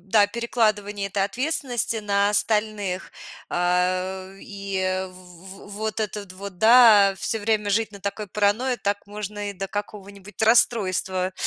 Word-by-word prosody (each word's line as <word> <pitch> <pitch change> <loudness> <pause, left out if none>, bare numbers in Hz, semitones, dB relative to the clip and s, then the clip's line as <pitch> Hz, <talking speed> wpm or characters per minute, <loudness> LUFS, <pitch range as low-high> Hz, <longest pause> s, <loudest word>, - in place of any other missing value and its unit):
Да, 205 +1 +4
перекладывание 215 -4 -1
этой 195 0 0
ответственности 250 +1 -2
на 200 -1 +1
остальных, 210 -2 -1 0.4
а, 185 +1 0
э, - - -16
и 195 -1 -5 0.3
в 185 +1 -13
в 205 - -11
вот 215 +1 -3
этот 205 -3 -4
вот, 190 -1 -9
да, 220 -3 +7
всё 225 +5 -2
время 210 0 0
жить 220 +2 +1
на 200 -1 -12
такой 200 +1 -4
паранойе, 210 +6 +1
так 205 -2 -3
можно 205 0 -5
и - - -7
до 195 +1 -4
какого-нибудь 205 0 -8
расстройства 190 -5 +2
205 Hz, 140 wpm, -24 LUFS, 195-215 Hz, 0.4 s, да